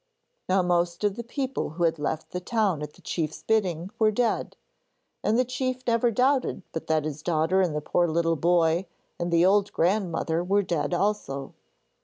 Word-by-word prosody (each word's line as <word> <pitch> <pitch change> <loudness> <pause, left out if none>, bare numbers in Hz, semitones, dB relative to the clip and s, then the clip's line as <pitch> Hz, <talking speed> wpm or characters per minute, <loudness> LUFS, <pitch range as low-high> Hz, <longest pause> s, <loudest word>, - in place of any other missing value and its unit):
Now 185 0 +3
most 175 +1 0
of 205 -2 +1
the 235 - -5
people 265 +2 -3
who 175 - 0
had 165 -2 +2
left 155 +2 -3
the 180 - -3
town 200 - 0
at 150 0 -6
the - - -21
chief's 155 -3 -3
bidding 185 -5 0
were 220 -1 +5
dead, 230 +2 -1 0.7
and 220 - +2
the 255 - +3
chief 255 0 -3
never 235 0 +2
doubted 255 -2 +1
but 160 - -5
that 155 -1 +1
his 150 -1 -4
daughter 165 +3 +2
and 170 -5 0
the 150 - -1
poor 175 +3 +1
little 165 +1 +1
boy 170 +2 +2 0.3
and 175 0 -2
the 170 +1 +4
old 200 +1 +3
grandmother 170 -2 0
were 200 +3 +2
dead 175 -1 -1
also. 170 -9 -2
180 Hz, 185 wpm, -26 LUFS, 165-215 Hz, 0.7 s, were